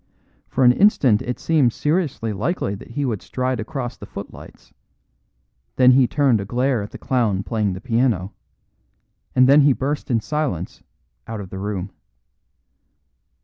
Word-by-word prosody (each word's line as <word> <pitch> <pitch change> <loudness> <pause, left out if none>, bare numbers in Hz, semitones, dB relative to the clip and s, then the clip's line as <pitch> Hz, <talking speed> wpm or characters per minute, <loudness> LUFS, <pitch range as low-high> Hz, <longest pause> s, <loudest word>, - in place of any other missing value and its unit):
For 130 - 0
an 125 - +7
instant 130 - +3
it 125 -1 -4
seemed 145 -8 +2
seriously 150 - -1
likely 105 - -2
that 100 - -10
he 140 +4 -2
would 110 -7 -2
stride 130 -1 -2
across 120 +1 -4
the - - -10
footlights; - - -11 1.0
then 125 0 +6
he 130 -1 +5
turned 135 -7 +2
a - - -3
glare 125 +2 0
at 100 - -6
the - - -10
clown 110 -7 0
playing 105 -4 -1
the 90 - -7
piano; 115 -6 0 1.0
and 130 0 +5
then 140 +2 +7
he 140 -1 +5
burst 145 +4 -3
in 120 -3 +2
silence 135 - -3 0.5
out 110 -1 -5
of 95 -3 -8
the 95 - -6
room. 100 -1 -4
125 Hz, 155 wpm, -21 LUFS, 105-135 Hz, 1.0 s, an